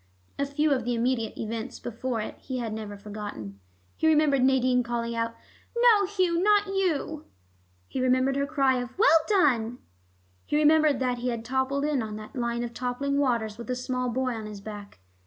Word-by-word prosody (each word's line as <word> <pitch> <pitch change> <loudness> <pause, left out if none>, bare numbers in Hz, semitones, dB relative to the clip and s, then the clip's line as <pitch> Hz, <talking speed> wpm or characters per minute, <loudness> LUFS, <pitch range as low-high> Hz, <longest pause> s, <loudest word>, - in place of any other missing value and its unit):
A 280 - +1
few 295 +2 +1
of 255 -3 -1
the 240 +1 -1
immediate 230 -1 -1
events 225 +2 -5
before 240 0 -3
it - - -6
he 260 - -5
had 230 -3 -3
never 210 -2 -6
forgotten. 200 - -7 0.4
He 320 - +1
remembered 300 -4 +4
Nadine 255 -1 +3
calling 235 -1 -3
out, 230 0 -2 0.4
"No 455 -5 +5
Hugh, 365 -4 +1
not 415 +1 +4
you," 345 -6 -1 0.6
he 260 - -3
remembered 255 +1 +2
her 280 0 0
cry 275 -4 +2
of 245 +4 -7
"Well 400 -6 +6
done"; 250 - +2 0.7
he - - -2
remembered 305 -1 +4
that 250 -1 0
he 245 - -3
had 230 -2 -4
toppled 265 +3 0
in 295 -4 +1
on 215 -1 -5
that 215 +4 -10
line 235 -1 -1
of 235 -1 -5
toppling 255 +4 -1
waters 235 -5 0
with 235 - -8
a 250 - 0
small 250 0 -2
boy 255 +2 -1
on 220 -2 -6
his 210 -1 -8
back. 205 0 -9
255 Hz, 190 wpm, -27 LUFS, 230-285 Hz, 0.7 s, Well